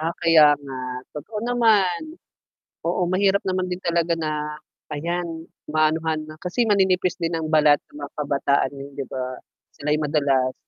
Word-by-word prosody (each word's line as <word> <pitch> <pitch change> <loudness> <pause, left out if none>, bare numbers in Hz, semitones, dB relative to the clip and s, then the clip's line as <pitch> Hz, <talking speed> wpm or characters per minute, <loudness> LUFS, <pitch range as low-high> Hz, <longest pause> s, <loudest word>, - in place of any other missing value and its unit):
Ah, 165 +2 -1
kaya 155 -3 +6
nga. 140 -2 -9 0.4
Totoo 170 +9 -6
naman. 230 - +2 0.7
Oo, 175 +1 0
mahirap 195 +2 +3
naman 185 -1 -1
din 180 - -3
talaga 170 -1 +1
na 150 -1 -3 0.3
ayan, 165 +2 -3 0.2
maanuhan 155 0 +1
na 155 - -9
kasi 180 +8 -1
maninipis 190 -3 +2
din 170 -1 -2
ang 160 -1 -2
balat 150 -2 +5
ng - - -19
mga 140 - -6
kabataan 140 -2 +1
ngayon 140 +1 -9
'di 135 - -2
ba, 130 - -3 0.5
sila'y 150 +1 0
madalas 140 -4 +1
160 Hz, 150 wpm, -23 LUFS, 150-180 Hz, 0.7 s, kaya